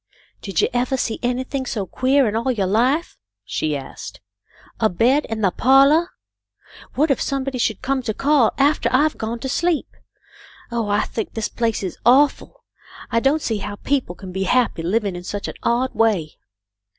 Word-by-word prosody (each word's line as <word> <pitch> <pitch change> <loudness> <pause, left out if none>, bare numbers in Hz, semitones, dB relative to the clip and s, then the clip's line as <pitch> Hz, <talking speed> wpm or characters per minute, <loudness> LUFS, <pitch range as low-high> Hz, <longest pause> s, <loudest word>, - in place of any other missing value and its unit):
" - - -37
Did 195 -5 -1
you - - +3
evah 250 +2 0
see 230 -3 -2
anything 255 +2 -2
so 205 -5 -2
queah 265 +7 +2
in 210 - -2
all 235 +3 0
yo' 205 -6 -1
life 250 - +1
?" - - -65
she 150 -2 -2
asked. 135 - -9 0.3
" - - -27
A 220 - +3
bed 250 +10 +2
in 225 -1 -4
the 195 -3 +3
pahlah! 275 - +4 0.9
What 300 +2 +2
if 270 - 0
some 275 -1 -1
body 265 -2 -4
should 220 -2 -1
come 265 0 0
to 225 -3 -3
call 280 -5 +3
aftah 280 -3 +2
I've 295 +4 +2
gone 225 +2 -3
to - - -3
sleep. 325 +4 -1 0.8
Oh, 230 -2 -1
I 205 0 +2
think 220 - -5
this 225 -1 -2
place 230 -3 -1
is 185 - -5
awful! 285 - +3 0.5
I 230 - +3
don't 280 +5 +1
see 220 -3 -1
how 205 +1 -5
people 260 -6 -2
can 190 0 -10
be 190 +1 -2
happy, 245 -5 +1
living 200 +2 -1
in 175 - -7
such 200 +2 -5
an - - -5
odd 245 +2 0
way." 205 -9 0
240 Hz, 195 wpm, -21 LUFS, 210-270 Hz, 0.9 s, pahlah